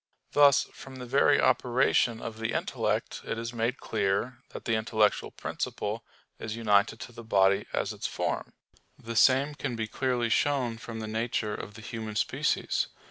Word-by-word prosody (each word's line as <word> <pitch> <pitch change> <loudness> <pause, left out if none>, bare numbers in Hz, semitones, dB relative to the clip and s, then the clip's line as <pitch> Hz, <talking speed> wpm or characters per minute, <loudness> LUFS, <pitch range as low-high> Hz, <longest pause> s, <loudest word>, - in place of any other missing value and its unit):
Thus 145 -1 +6
from 135 -1 -11
the 125 -1 -7
very 140 +3 +4
operation 120 -2 +2
of 110 -1 -6
the 110 +1 -2
intellect - - -1
it - - -3
is 115 +1 -4
made 120 +3 -1
clear 110 +6 -1
that - - -9
the 115 - +1
intellectual 110 -1 +2
principle - - -4 0.4
is 110 0 -4
united 110 -1 +2
to - - -7
the 115 0 -10
body 100 -3 +3
as - - -1
its - - -3
form. - - -3 0.4
The 115 0 -7
same 135 +5 +5
can 135 -4 -4
be 110 -1 -2
clearly 125 0 0
shown 125 -3 +1
from 115 -1 -7
the 110 - -4
nature 110 -1 -1
of 105 0 -7
the 110 - -11
human 110 0 -5
species. - - 0
115 Hz, 170 wpm, -29 LUFS, 110-125 Hz, 0.4 s, Thus